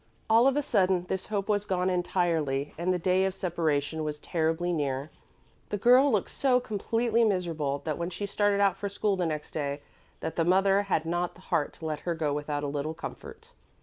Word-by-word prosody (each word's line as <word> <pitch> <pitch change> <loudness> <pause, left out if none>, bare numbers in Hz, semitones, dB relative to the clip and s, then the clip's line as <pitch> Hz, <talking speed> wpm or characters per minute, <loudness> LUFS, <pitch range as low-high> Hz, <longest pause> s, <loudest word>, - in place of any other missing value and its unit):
All 230 +3 +6
of 275 +1 +2
a 295 - +1
sudden 185 -6 +2
this 190 -1 -3
hope 200 -2 -2
was 205 -1 +1
gone 185 -2 0
entirely, 165 -6 0
and 175 +3 0
the 180 - +1
day 185 +2 +2
of 190 0 0
separation 160 -4 -1
was 150 -1 -3
terribly 165 +3 -1
near. 140 -1 -2 0.6
The 205 - -1
girl 250 +6 +5
looked 210 -5 0
so 255 -2 +2
completely 230 +1 0
miserable 165 -9 0
when 170 +2 -2
she 205 - -4
started 205 0 +1
out 200 -2 +3
for 200 0 -3
school 200 0 0
next 160 -5 -2
day 145 -2 -3 0.4
that - - -4
the 165 - +3
mother 195 +3 +4
had 190 -5 0
not 175 +1 -1
the 180 - -16
heart 150 -5 0
to 160 - -10
let 155 -1 -2
her 170 +1 -2
go 155 -3 -1
without 145 0 -3
a - - -1
little 145 +2 -3
comfort. - - -9
175 Hz, 200 wpm, -28 LUFS, 155-200 Hz, 0.6 s, All